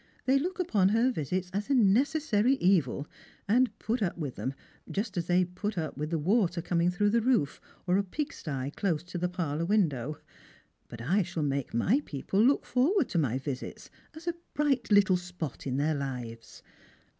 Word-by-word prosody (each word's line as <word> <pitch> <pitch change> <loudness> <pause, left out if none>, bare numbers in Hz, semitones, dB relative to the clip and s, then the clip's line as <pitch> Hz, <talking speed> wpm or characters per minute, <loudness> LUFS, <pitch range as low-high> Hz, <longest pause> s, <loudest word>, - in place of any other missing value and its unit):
They 265 +1 +4
look 365 +7 -3
upon 210 - +3
her 230 +5 +3
visits 180 - -3
as 205 +6 -2
a 280 - +3
necessary 250 +2 +3
evil, 175 - +2 0.4
and 235 0 +2
put 230 +2 -2
up 180 -4 -1
with 145 -6 -4
them, 135 +1 -4 0.3
just 200 0 -3
as 175 -1 -2
they 180 +1 +3
put 190 +3 -4
up 155 -3 -3
with 150 +2 -3
the 165 - 0
water 180 +1 +2
coming 170 0 +1
through 205 +3 +1
the 230 +1 +3
roof, 225 - +1 0.2
or 180 0 +3
a 200 - +2
pig 295 - -4
stye 140 -3 -4
close 170 -6 0
to 175 0 -6
the 180 +1 0
parlour 165 -3 -2
window. 155 - +1 0.7
But 115 - -9
I 180 - +2
shall 175 -3 -3
make 140 -4 -2
my 210 - +3
people 165 +8 -1
look 270 +4 +3
forward 295 - +2
to 175 - 0
my 130 -5 +1
visits 135 -1 -6 0.2
as 315 +2 -11
a 345 - +1 0.2
bright 275 -6 +1
little 200 -2 +5
spot 180 -6 -6
in 130 0 -1
their 150 +3 +1
hves." 125 -5 -6
180 Hz, 190 wpm, -29 LUFS, 150-225 Hz, 0.7 s, little